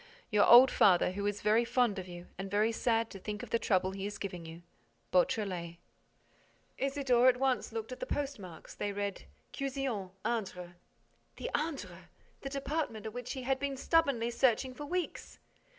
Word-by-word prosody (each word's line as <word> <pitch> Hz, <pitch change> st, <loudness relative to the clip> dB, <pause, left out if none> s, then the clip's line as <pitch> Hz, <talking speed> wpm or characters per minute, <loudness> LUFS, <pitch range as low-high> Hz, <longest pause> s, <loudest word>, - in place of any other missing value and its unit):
Your 210 Hz, -1 st, +4 dB
old 250 Hz, +2 st, +9 dB
father, 180 Hz, -2 st, +4 dB
who 200 Hz, +2 st, -2 dB
is 205 Hz, 0 st, -3 dB
very 215 Hz, +3 st, +4 dB
fond 235 Hz, -4 st, +1 dB
of 185 Hz, -, -7 dB
you 175 Hz, 0 st, -9 dB
and 195 Hz, +1 st, -6 dB
very 210 Hz, +3 st, +2 dB
sad 230 Hz, 0 st, 0 dB
to 195 Hz, -, -8 dB
think 210 Hz, +2 st, -5 dB
of -, -, -9 dB
the 230 Hz, -, +2 dB
trouble 185 Hz, -3 st, +1 dB
he 195 Hz, +1 st, -4 dB
is 205 Hz, +1 st, -6 dB
giving 180 Hz, -4 st, -6 dB
you, 165 Hz, +1 st, -10 dB, 0.5 s
BEAUTRELET. 180 Hz, -2 st, 0 dB, 1.0 s
Isidore 270 Hz, -3 st, +3 dB
at 250 Hz, -, +2 dB
once 260 Hz, -2 st, 0 dB
looked 225 Hz, +2 st, -5 dB
at 255 Hz, -, -7 dB
the -, -, -4 dB
postmarks. 210 Hz, -, -5 dB
They 205 Hz, -, -3 dB
read, 200 Hz, -1 st, -4 dB, 0.3 s
"Cuzion, 270 Hz, -8 st, -3 dB, 0.2 s
Indre." 185 Hz, -6 st, -3 dB, 0.6 s
The -, -, -5 dB
Indre! 185 Hz, -, -4 dB, 0.3 s
The 275 Hz, -, -5 dB
department 275 Hz, -6 st, -3 dB
which 245 Hz, 0 st, -5 dB
he 260 Hz, -, -6 dB
had 265 Hz, +1 st, 0 dB
been 280 Hz, -1 st, -2 dB
stubbornly 275 Hz, -6 st, +2 dB
searching 255 Hz, +1 st, +2 dB
for 290 Hz, +3 st, -7 dB
weeks! 360 Hz, +1 st, -4 dB
225 Hz, 170 wpm, -32 LUFS, 195-265 Hz, 1.0 s, old